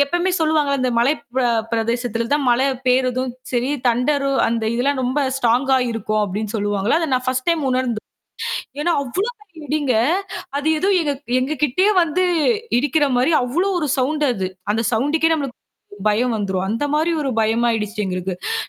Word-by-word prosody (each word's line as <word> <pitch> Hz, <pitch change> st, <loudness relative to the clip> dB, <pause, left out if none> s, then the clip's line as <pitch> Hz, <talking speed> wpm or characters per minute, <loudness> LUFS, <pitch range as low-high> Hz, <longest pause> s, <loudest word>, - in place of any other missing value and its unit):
எப்போயுமே 350 Hz, +5 st, 0 dB
சொல்லுவாங்கல, 305 Hz, -3 st, +1 dB
இந்த 255 Hz, -, +1 dB
மலை 240 Hz, +5 st, +4 dB, 0.2 s
ப 260 Hz, -, +3 dB, 0.3 s
பிரதேசத்துல 230 Hz, 0 st, -1 dB
தான் 290 Hz, -2 st, +2 dB
மழை 260 Hz, +3 st, +3 dB, 0.2 s
பெய்யறதும் 255 Hz, 0 st, +1 dB, 0.2 s
சரி, 245 Hz, +2 st, 0 dB, 0.2 s
தண்டரு 275 Hz, +4 st, +1 dB, 0.2 s
அந்த 230 Hz, 0 st, -1 dB
இதெல்லாம் 260 Hz, +2 st, 0 dB
ரொம்ப 255 Hz, +4 st, 0 dB, 0.2 s
ஸ்ட்ராங்கா 260 Hz, +2 st, +2 dB, 0.2 s
இருக்கும் 215 Hz, -1 st, -1 dB
அப்படின்னு 205 Hz, +3 st, -4 dB
சொல்லுவாங்கல. 205 Hz, +5 st, +1 dB
அதை 325 Hz, -, -1 dB
நான் 255 Hz, 0 st, -1 dB
ஃபர்ஸ்ட் 255 Hz, +2 st, -1 dB
டைம் 335 Hz, -2 st, +2 dB
உணர்ந்தேன். 255 Hz, -4 st, -1 dB, 0.8 s
ஏன்னா 345 Hz, +3 st, +1 dB
அவ்வளோ 365 Hz, -, -2 dB, 0.4 s
இடிங்கங்க, 290 Hz, -3 st, 0 dB, 0.6 s
அது 290 Hz, +2 st, -2 dB
ஏதோ 375 Hz, -, 0 dB, 0.5 s
எங்க 270 Hz, +4 st, -1 dB
கிட்டயே 370 Hz, +10 st, +2 dB
வந்து 335 Hz, +3 st, 0 dB, 0.6 s
இடிக்கிற 290 Hz, +2 st, +2 dB
மாரி 260 Hz, +7 st, +2 dB
அவ்வளவு 355 Hz, +10 st, 0 dB
ஒரு 300 Hz, -, -1 dB
சவுண்ட் 295 Hz, +3 st, +1 dB
அது. 190 Hz, -3 st, -2 dB, 0.2 s
அந்த 220 Hz, +2 st, 0 dB
சவுண்டுக்கே 300 Hz, +8 st, +2 dB
நம்மளுக்கு 275 Hz, -5 st, -4 dB, 0.5 s
பயம் 235 Hz, +3 st, +1 dB
வந்துரும். 190 Hz, -2 st, -2 dB
அந்த 230 Hz, +6 st, -1 dB
மாரி 320 Hz, +3 st, +1 dB
ஒரு 275 Hz, -, -1 dB
பயமா 225 Hz, +2 st, +2 dB
ஆயிடுச்சு 210 Hz, -1 st, -2 dB
எங்களுக்கு. 185 Hz, -, -3 dB
255 Hz, 155 wpm, -20 LUFS, 230-295 Hz, 0.8 s, மலை